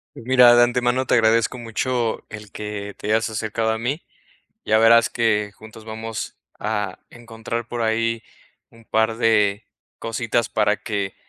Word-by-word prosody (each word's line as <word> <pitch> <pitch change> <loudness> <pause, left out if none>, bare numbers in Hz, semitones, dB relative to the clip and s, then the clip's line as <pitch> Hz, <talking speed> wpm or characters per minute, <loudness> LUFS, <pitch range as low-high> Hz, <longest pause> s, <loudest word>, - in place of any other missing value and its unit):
Mira, 125 0 +5
de 120 - +7
antemano 125 +1 +1
te - - 0
agradezco 115 +1 +3
mucho 120 0 -2
el 105 -2 -10
que 105 -1 -6
te - - -11
hayas 110 +1 +1
acercado 110 +1 -2
a 110 - -1
mí. 130 +8 -2 0.6
Ya 110 0 +3
verás 115 +1 +5
que 105 -3 0
juntos 110 +1 -13
vamos 110 0 -6 0.2
a 105 -3 -3
encontrar 115 0 -6
por 120 -1 -3
ahí 115 0 0 0.5
un 115 -1 -20
par 110 0 +1
de 105 -2 +2 0.3
cositas 115 0 -1
para 105 0 +1
que, 100 -3 -3
115 Hz, 150 wpm, -22 LUFS, 110-115 Hz, 0.6 s, de